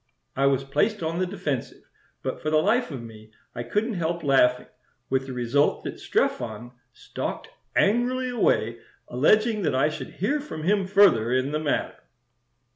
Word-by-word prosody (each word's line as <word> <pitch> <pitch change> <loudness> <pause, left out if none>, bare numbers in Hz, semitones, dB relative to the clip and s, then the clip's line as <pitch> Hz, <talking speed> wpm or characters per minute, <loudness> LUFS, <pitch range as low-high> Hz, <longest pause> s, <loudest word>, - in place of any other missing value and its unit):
I 135 +1 +2
was 135 -1 +2
placed 190 +9 0
on 165 +2 -2
the 185 - 0
defensive, 145 -9 -4 0.4
but - - -4
for 155 - -1
the 155 - +3
life 220 +10 +2
of 135 -6 -6
me 110 -1 -12 0.2
I 120 - -5
couldn't 210 - -1
help 170 -2 -2
laughing, 125 -3 +3 0.5
with 135 0 0
the 130 - -5
result 125 +4 +1
that - - -6
Strephon 110 +2 -2 0.2
stalked - - -6 0.3
angrily 250 +4 +2
away, 120 - +1 0.3
alleging 215 - +2
that 150 -7 0
I 135 +4 +3
should 155 - -7
hear 245 - 0
from 215 - -7
him 195 +2 +1
further 190 - +4
in 130 +2 +1
the 150 - -1
matter." 155 -2 -2
155 Hz, 165 wpm, -25 LUFS, 130-205 Hz, 0.5 s, further